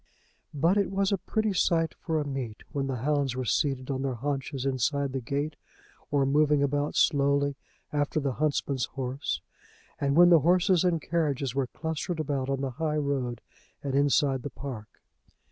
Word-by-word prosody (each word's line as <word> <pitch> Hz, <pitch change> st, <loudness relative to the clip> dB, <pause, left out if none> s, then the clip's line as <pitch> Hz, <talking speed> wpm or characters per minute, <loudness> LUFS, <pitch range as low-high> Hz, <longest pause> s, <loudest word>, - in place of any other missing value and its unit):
But 165 Hz, +7 st, +3 dB
it 200 Hz, -, +1 dB
was 195 Hz, +1 st, +1 dB
a 200 Hz, -, +1 dB
pretty 215 Hz, +3 st, -1 dB
site 165 Hz, -3 st, +2 dB
for 160 Hz, -2 st, -2 dB
a 150 Hz, -, -2 dB
meet 130 Hz, -6 st, -5 dB
when 140 Hz, -1 st, -2 dB
the 135 Hz, -, -2 dB
hounds 145 Hz, -4 st, +1 dB
were 130 Hz, 0 st, -2 dB
seated 135 Hz, +1 st, 0 dB
on 135 Hz, -1 st, -2 dB
their 135 Hz, -2 st, -1 dB
haunches 135 Hz, +1 st, -3 dB
inside 135 Hz, +1 st, 0 dB
the 135 Hz, -, -2 dB
gate, 145 Hz, +4 st, -2 dB, 0.5 s
or 140 Hz, -1 st, +2 dB
moving 145 Hz, +1 st, +3 dB
about 145 Hz, +1 st, 0 dB
slowly 140 Hz, -1 st, +3 dB, 0.4 s
after 145 Hz, +1 st, 0 dB
the 140 Hz, -2 st, -1 dB
huntsman's 140 Hz, -4 st, +1 dB
horse, 135 Hz, 0 st, -3 dB, 0.6 s
and 140 Hz, 0 st, +1 dB
when 175 Hz, +1 st, +8 dB
the 170 Hz, -, +8 dB
horses 180 Hz, +3 st, +3 dB
and 175 Hz, -2 st, +2 dB
carriages 145 Hz, -6 st, 0 dB
were 135 Hz, -1 st, 0 dB
clustered 160 Hz, +4 st, -4 dB
about 140 Hz, -3 st, -1 dB
on 135 Hz, -1 st, -1 dB
the 135 Hz, -1 st, -2 dB
high 155 Hz, +3 st, -1 dB
road 135 Hz, -5 st, -1 dB, 0.4 s
and 140 Hz, -2 st, -2 dB
inside 140 Hz, -1 st, +3 dB
the 145 Hz, -, -5 dB
park. 125 Hz, -7 st, -8 dB
140 Hz, 175 wpm, -28 LUFS, 135-155 Hz, 0.6 s, when